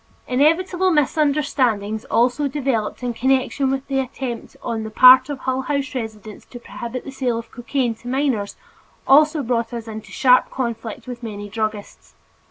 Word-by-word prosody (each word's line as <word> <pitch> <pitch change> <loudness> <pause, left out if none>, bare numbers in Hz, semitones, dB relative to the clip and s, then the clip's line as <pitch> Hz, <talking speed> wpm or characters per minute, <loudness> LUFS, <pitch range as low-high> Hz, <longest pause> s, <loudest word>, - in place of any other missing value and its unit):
Inevitable 345 +8 +2
misunderstanding 275 - +1
also 250 +5 +2
developed 260 -5 -2
in 245 -1 -2
connection 265 +2 +1
with 270 0 -2
the 270 -1 -1
attempt 255 -2 -5
on 225 -1 -3
the 220 - -5
part 255 +5 +7
of 285 - -3
Hull 260 0 -1
House 280 +1 -2
residents 220 -4 -7
to 245 - -11
prohibit 240 +1 -7
the 275 - -8
sale 255 -3 -1
of 230 0 -8
cocaine 245 -1 -2
to 230 +2 -14
minors, 255 -6 -1 0.5
which 300 +3 +6
brought 235 0 -1
us 230 -1 -6
into 220 -1 -8
sharp 255 -1 +4
conflict 235 -3 -5
with 250 -1 -8
many 205 -3 -7
druggists. 215 -1 -5
250 Hz, 160 wpm, -21 LUFS, 225-270 Hz, 0.5 s, part